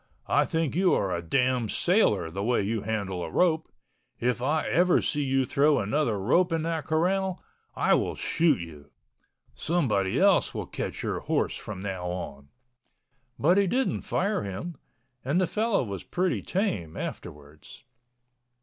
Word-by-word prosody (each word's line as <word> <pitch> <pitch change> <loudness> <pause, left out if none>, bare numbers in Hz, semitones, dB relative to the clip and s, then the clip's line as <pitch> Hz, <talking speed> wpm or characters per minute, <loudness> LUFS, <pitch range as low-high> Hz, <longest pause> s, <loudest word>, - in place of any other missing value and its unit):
I - - +3
think 160 -3 -1
you 185 +1 +3
are 95 -3 0
a 85 - -3
damn 125 +5 +1
sailor 105 - +2
the 100 +4 -4
way 120 -1 +1
you 110 +2 -1
handle 100 -4 -3
a - - -5
rope. 160 -3 +1 0.5
If 125 0 0
I 150 +5 0
ever 180 +1 +4
see 150 - -1
you 135 -1 +1
throw 145 +3 +3
another 115 +1 0
rope 170 - +2
in 165 -1 0
that 165 -3 -2
corral, 185 +4 0 0.3
I - - +3
will - - +1
shoot 165 - +2
you. 80 -4 -10 0.6
Somebody 115 - 0
else - - +3
will - - -3
catch - - -5
your - - -2
horse - - -1
from 100 -3 -7
now 95 -3 -4
on." 70 -6 -6 0.9
But 175 +7 +4
he 200 - +3
didn't 255 +7 0
fire 200 +4 -1
him, 100 - -5 0.5
and 140 +7 +1
the 185 - +3
fellow 215 - 0
was 100 -5 -5
pretty 180 0 -1
tame 180 - -2
afterwards. 75 0 -8
135 Hz, 160 wpm, -27 LUFS, -, 0.9 s, ever